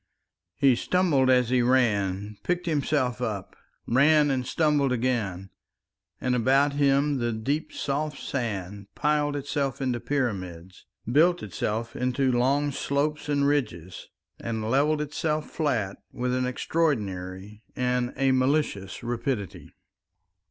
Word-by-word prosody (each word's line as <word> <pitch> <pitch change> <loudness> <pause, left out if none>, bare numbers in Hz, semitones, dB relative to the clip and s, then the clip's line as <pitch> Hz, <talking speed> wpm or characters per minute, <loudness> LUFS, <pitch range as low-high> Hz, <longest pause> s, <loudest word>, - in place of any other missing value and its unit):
He 135 +2 +4
stumbled 150 -4 +2
as 125 -2 +4
he 125 -1 +3
ran, 105 -5 +1
picked 180 +5 -1
himself 140 -5 0
up, 105 -6 -4 0.3
ran 145 +3 +4
and 130 -2 -1
stumbled 145 -2 +2
again; 110 -7 -1 0.7
and 125 - 0
about 135 +4 +3
him 140 0 +2
the 120 -1 0
deep 135 +8 -2
soft 145 +1 -2
sand 100 -6 -4
piled 150 -1 +1
itself 140 -1 -2
into 130 -3 -1
pyramids, 95 -11 -4 0.2
built 170 +6 +4
itself 110 +3 -3
into 130 +1 +1
long 135 +4 +2
slopes 145 +2 -1
and 140 -1 +2
ridges, 105 - -2 0.3
and 110 -1 -3
levelled 150 +3 +2
itself 155 +1 -2
flat 120 - -1
with 125 0 -2
an 130 0 0
extraordinary 105 - -2
and 125 0 0
a 135 0 +3
malicious 130 -7 0
rapidity. 120 -3 -3
130 Hz, 120 wpm, -26 LUFS, 110-145 Hz, 0.7 s, He